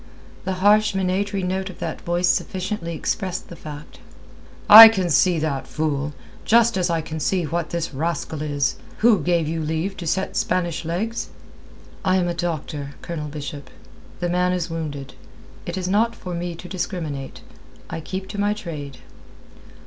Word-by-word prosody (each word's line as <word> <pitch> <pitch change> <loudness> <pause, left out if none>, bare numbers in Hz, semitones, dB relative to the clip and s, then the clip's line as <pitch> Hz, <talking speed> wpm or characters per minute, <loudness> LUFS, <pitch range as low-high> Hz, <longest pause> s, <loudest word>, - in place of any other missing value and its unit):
The 190 - -1
harsh, 210 0 +5
minatory 195 +1 0
note 190 +1 -2
of 185 - -10
that 165 -2 -5
voice 175 +1 0
sufficiently 185 -2 -1
expressed 185 +2 -3
the 170 - -8
fact. 150 -1 -10 0.7
"I 225 +2 +14
can 190 -6 -1
see 175 +3 +4
that, 150 -4 -2
fool; 150 -2 -2 0.3
just 235 0 +4
as 180 -2 +1
I 165 -1 +1
can 160 0 -6
see 180 +3 +1
what 165 +1 -2
the 170 -1 -2
rascal 155 +1 -3
is. 145 -3 0 0.3
Who 225 -5 +6
gave 170 0 +1
you 165 +1 -2
leave 160 +5 -2
to 175 - -6
set 190 +4 -1
Spanish 175 -3 -1
legs?" 215 +8 -2 0.7
"I 185 - +3
am 180 -2 +2
a 175 - -1
doctor, 155 -4 -4
Colonel 155 -3 -4
Bishop. 145 -1 -7 0.5
The 175 - 0
man 180 +1 +1
is 175 -2 -2
wounded. 145 -5 -5 0.5
It 175 +2 -3
is 185 -1 -2
not 225 +5 +2
for 180 -5 -7
me 170 0 -3
to 180 - -10
discriminate. 170 -7 -4 0.5
I 165 - -5
keep 190 +4 -5
to 205 - -5
my 205 +1 +1
trade." 150 -9 -7
175 Hz, 165 wpm, -22 LUFS, 155-190 Hz, 0.7 s, I